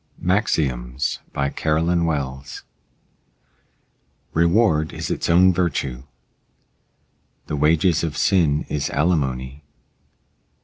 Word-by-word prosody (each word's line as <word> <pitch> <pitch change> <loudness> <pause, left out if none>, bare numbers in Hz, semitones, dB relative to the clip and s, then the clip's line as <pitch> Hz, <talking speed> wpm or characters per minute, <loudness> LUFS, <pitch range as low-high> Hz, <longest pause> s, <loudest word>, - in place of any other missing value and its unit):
MAXIOMS 70 - -1
BY 70 0 -1
CAROLYN 85 +2 0
WELLS 70 -4 -4 1.7
Reward 85 -2 +2
is - - -4
its - - -2
own 90 +2 +5
virtue. 70 -7 -2 1.4
The 75 - -4
wages 80 +3 +2
of 80 -3 -3
sin 80 -7 +2
is 75 -2 -2
alimony. 70 -4 -1
75 Hz, 85 wpm, -21 LUFS, 70-85 Hz, 1.7 s, own